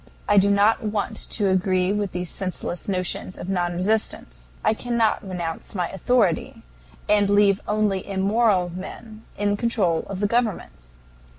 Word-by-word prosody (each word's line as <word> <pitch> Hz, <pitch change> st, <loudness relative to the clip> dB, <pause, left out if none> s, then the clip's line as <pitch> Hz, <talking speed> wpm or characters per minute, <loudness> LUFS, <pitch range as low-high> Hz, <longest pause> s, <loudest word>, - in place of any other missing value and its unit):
I 205 Hz, -1 st, +6 dB
do 200 Hz, +1 st, +3 dB
not 205 Hz, +2 st, +3 dB
want 210 Hz, -1 st, -3 dB
to 205 Hz, -3 st, 0 dB
agree 185 Hz, 0 st, +1 dB
with 205 Hz, -2 st, -2 dB
these 180 Hz, -1 st, -4 dB
senseless 185 Hz, -2 st, -4 dB
notions 185 Hz, -1 st, -1 dB
of 185 Hz, -, -7 dB
non 175 Hz, -2 st, 0 dB
resistance. 175 Hz, -, -2 dB, 0.2 s
I -, -, +4 dB
cannot 235 Hz, -1 st, 0 dB
renounce 180 Hz, -3 st, -5 dB
my 180 Hz, -3 st, -1 dB
authority 195 Hz, -2 st, 0 dB, 0.4 s
and 205 Hz, -1 st, +3 dB
leave 205 Hz, -1 st, +4 dB
only 210 Hz, -3 st, 0 dB
immoral 195 Hz, -1 st, +2 dB
men 215 Hz, +4 st, -9 dB
in 205 Hz, 0 st, 0 dB
control 205 Hz, -8 st, +1 dB
of 195 Hz, -1 st, -5 dB
the 205 Hz, -, +1 dB
government. 215 Hz, -, -1 dB
200 Hz, 150 wpm, -23 LUFS, 185-210 Hz, 0.4 s, I